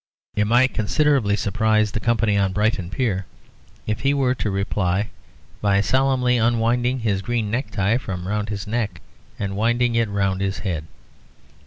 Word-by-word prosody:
It 105 0 +1
might 125 +4 +4
considerably 125 -1 +2
surprise 110 +1 +1
the 110 - -2
company 115 -2 +1
on 100 -1 +1
Brighton 105 -3 0
Pier, 100 -4 -1 0.6
if 105 -1 -2
he 140 +1 +1
were 130 -2 +2
to 110 - -2
reply 100 0 -1 0.5
by 100 -1 +3
solemnly 130 +2 +2
unwinding 120 +2 +1
his 100 -4 0
green 115 -1 -2
necktie 110 -3 0
from 90 -7 -5
round 105 0 -2
his 100 -1 -4
neck, 110 0 -2 0.4
and 100 -1 -3
winding 120 +3 +1
it 115 -2 +1
round 100 -1 0
his 95 0 -1
head. 80 -6 -3
110 Hz, 155 wpm, -22 LUFS, 100-120 Hz, 0.6 s, might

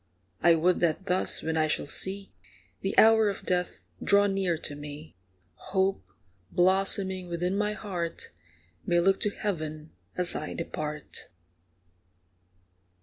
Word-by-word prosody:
I 170 0 +6
would 175 +3 +2
that 170 +2 +1
thus, 185 -1 0
when 160 0 -1
I 155 0 +3
shall 155 - -1
see 195 +6 -4 0.5
The 195 - -3
hour 220 -1 +7
of 200 - -5
death 180 - -2 0.2
draw 200 0 +5
near 195 -4 0
to 145 -2 -5
me, 145 +1 -9 0.4
Hope, 190 - -1 0.5
blossoming 190 0 +2
within 175 +2 -1
my 210 +1 0
heart, 180 -6 -5 0.5
May 175 0 +2
look 190 +3 +3
to 210 - +1
heaven 155 -7 -4 0.3
as 180 -1 +2
I - - -4
depart. 150 -3 -5
180 Hz, 130 wpm, -28 LUFS, 160-195 Hz, 0.5 s, hour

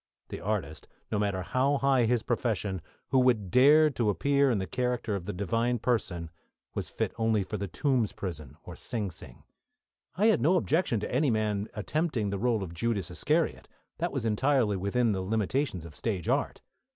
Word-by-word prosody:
The - - -6
artist, 95 -8 -3 0.2
no 105 - 0
matter 100 -3 -1
how 135 +8 +1
high 135 -1 +3
in 115 -2 +3
his 120 -3 +1
profession, 105 -6 -1 0.3
who 135 - +4
would 115 -7 +2
dare 150 +4 +6
to 120 -5 0
appear 140 - +2
in 120 - +2
the 95 - -2
character 125 +2 -1
of 95 -2 -4
the - - -1
Divine 115 +6 0
Person, 95 -9 -1 0.4
was - - -4
fit - - -2
only 110 -2 +2
for 105 +3 -5
the 100 0 -3
Tombs 125 - 0
prison 75 -7 -7
or 85 - -9
Sing 105 -2 -3
Sing. 65 -6 -12 0.7
I 200 +5 +2
had 220 -1 +4
no 170 +6 +4
objection 160 - +1
to - - -4
any 140 +3 +3
man 105 -2 0
attempting 115 - -1
the 100 - -2
role 115 -3 +1
of 85 -3 -7
Judas 100 0 -1
Iscariot. - - 0 0.3
That - - -1
was - - -3
entirely 115 -1 +2
within 105 +5 +1
the 95 -2 -1
limitations 105 - -1
of 80 -3 -11
stage 95 -4 -3
art. - - 0
110 Hz, 190 wpm, -29 LUFS, 95-125 Hz, 0.7 s, dare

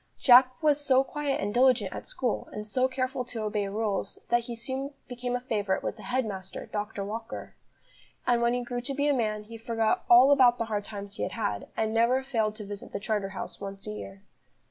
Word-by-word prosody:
Jack 255 0 +7
was 295 -1 +4
so 265 -1 +4
quiet 290 0 -2
and 205 +1 -2
diligent 245 -6 +3
at - - -7
school, - - -2
and 210 0 -6
so 255 +5 +2
careful 255 0 -2
to 230 -2 -5
obey 210 -1 -1
rules, 205 0 -2
that 240 0 +2
he 235 - -5
soon 265 +4 -4
became 245 0 -3
a - - 0
favourite 205 -6 -1
with - - -2
the 220 - -13
head 250 +2 0
master, 190 -3 -6
Dr. 210 -1 -4
Walker; 220 +3 -6 0.7
and 240 -1 +3
when 235 0 +3
he 245 - -1
grew 245 0 -4
to 275 +3 -4
be 285 +1 +1
a 290 - +4
man, 215 -4 -1
he 225 +2 -10
forgot 225 -1 0
all 250 +4 +8
about 250 -4 +6
the 230 - -1
hard 210 -2 -2
times 200 -1 -7
he - - -5
had - - -2
had, 105 - -2
and 220 0 0
never 240 +4 +3
failed 225 -5 0
to 215 -2 -7
visit 205 0 -8
the - - -2
Charterhouse 200 -2 -3
once 195 0 -7
a - - -4
year. 100 -2 -8
230 Hz, 220 wpm, -28 LUFS, 210-255 Hz, 0.7 s, all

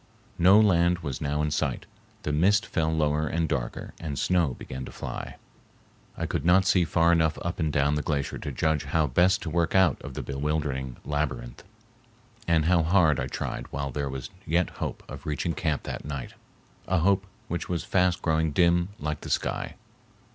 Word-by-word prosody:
No 95 +4 +7
land 90 -4 +4
was 70 -5 -4
now 75 +1 0
in 75 - -1
sight. 75 - -1 0.4
The 75 - -1
mist 100 +7 +3
fell 80 -1 0
lower 75 -1 +1
and 80 0 0
darker 60 -6 -3
and 75 -4 -4
snow 85 -8 +1
began 65 0 -7
to - - -9
fly. - - -6 0.8
I - - -2
could - - -2
not 90 +3 +5
see 90 -2 +4
far 85 +2 +3
enough 80 -2 +2
up 85 +1 -3
and 80 -2 +1
down 70 0 +2
the 75 - 0
glacier 70 -2 -2
to - - -5
judge 80 -3 0
how 80 +3 +1
best 90 +8 +3
to 80 - -4
work 85 +1 +1
out 95 -6 +4
of 70 - -8
the - - -4
bewildering 70 -2 -2
labyrinth, 65 -5 -3 0.9
and 80 -2 +3
how 85 0 +4
hard 80 -3 +3
I 65 - -1
tried - - -4
while 70 0 -4
there 70 +2 -2
was 65 -1 -6
yet 85 +1 +1
hope - - -3
of - - -9
reaching 75 +3 -1
camp 80 -6 -1
that - - -5
night! 70 -2 -6 0.5
a 95 - +2
hope 100 +2 +2 0.2
which 85 - -4
was 85 -2 -1
fast 90 -2 +1
growing 80 -1 +1
dim 85 +1 +3
like 75 0 -3
the - - -7
sky. - - -1
80 Hz, 190 wpm, -27 LUFS, 70-85 Hz, 0.9 s, No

